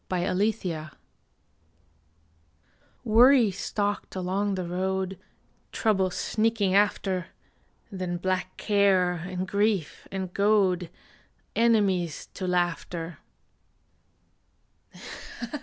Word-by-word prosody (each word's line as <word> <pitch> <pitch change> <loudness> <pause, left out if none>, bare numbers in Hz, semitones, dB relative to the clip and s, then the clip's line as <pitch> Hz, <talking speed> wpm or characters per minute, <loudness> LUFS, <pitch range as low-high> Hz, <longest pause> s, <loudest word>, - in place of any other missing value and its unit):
LAUGHTER 180 -4 -1 2.1
WORRY 235 0 +6
stalked 205 +2 -3
along 190 +2 -1
the 185 -1 -3
road, 190 +1 -2 0.5
Trouble 195 -4 +1
sneaking 215 0 0
after; 195 -3 +1 0.6
Then 185 -2 -3
Black 185 +1 -2
Care, 200 -4 +3
and 180 +2 -4
Grief, 200 -4 0
and 190 -2 -4
Goad 195 -4 +2 0.7
Enemies 200 -8 +2
to 185 - -4
Laughter. 175 -1 -2
190 Hz, 75 wpm, -27 LUFS, 180-205 Hz, 2.1 s, WORRY